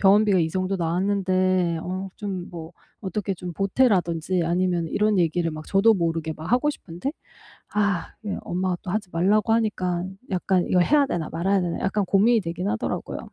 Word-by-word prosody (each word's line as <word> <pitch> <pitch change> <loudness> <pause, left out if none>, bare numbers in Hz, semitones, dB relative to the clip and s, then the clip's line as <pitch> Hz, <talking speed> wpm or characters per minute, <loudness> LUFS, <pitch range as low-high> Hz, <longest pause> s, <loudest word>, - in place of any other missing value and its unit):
병원비가 200 -1 +5
이 160 - +1
정도 185 +2 -1
나왔는데 185 0 +1
어 185 +1 -4
좀 190 -4 -5
뭐 165 0 -8 0.3
어떻게 200 0 -2
좀 180 -1 -6
보태라든지 185 -5 +1
아니면 175 0 +1
이런 210 +2 +1
얘기를 170 0 +1
막 155 0 -7
저도 220 +3 +4
모르게 165 -3 -1
막 160 +2 -7
하고 255 +4 +3
싶은데 185 - -6 0.6
아 200 -5 0
그게 205 -2 -3
엄마가 180 0 -1
또 180 - -5
하지 205 -2 -2
말라고 205 +6 +2
하니깐 190 -4 -1
약간 185 0 +1
이거 180 - +3
해야 290 +9 +4
되나 165 -8 -2
말아야 190 +4 +1
되나 175 -1 -2
약간 195 +1 0
고민이 220 +4 +4
되긴 175 +2 -3
하더라고요. 225 +1 -3
185 Hz, 375 characters per minute, -24 LUFS, 175-205 Hz, 0.6 s, 병원비가